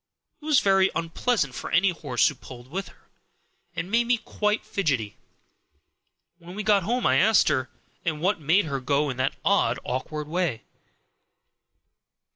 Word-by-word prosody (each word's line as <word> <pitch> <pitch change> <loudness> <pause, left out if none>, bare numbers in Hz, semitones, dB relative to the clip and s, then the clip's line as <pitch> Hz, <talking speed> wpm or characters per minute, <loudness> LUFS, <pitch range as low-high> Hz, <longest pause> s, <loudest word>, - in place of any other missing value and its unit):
It - - -13
was 305 -4 +4
very 195 -1 +4
unpleasant 165 - -1
for - - -6
any 195 0 +3
horse 140 -8 +1
who - - -1
pulled 125 -2 -13
with 195 +3 -4
her, - - -20 0.7
and 180 - -4
made 235 +1 +2
me 245 0 +3
quite 210 -1 -2
fidgety. 135 - -1 1.2
When 175 +2 -11
we 210 - -4
got 205 -2 +4
home 240 +7 -1
I 130 - +4
asked 215 +5 +4
her 130 -3 0 0.3
what 170 +3 -1
made 165 +7 +3
her 140 -3 -3
go 140 +2 0
in 125 - -8
that 130 +1 0
odd, - - +2
awkward 150 +4 -4
way. 165 -7 -2
170 Hz, 155 wpm, -25 LUFS, 135-205 Hz, 1.2 s, was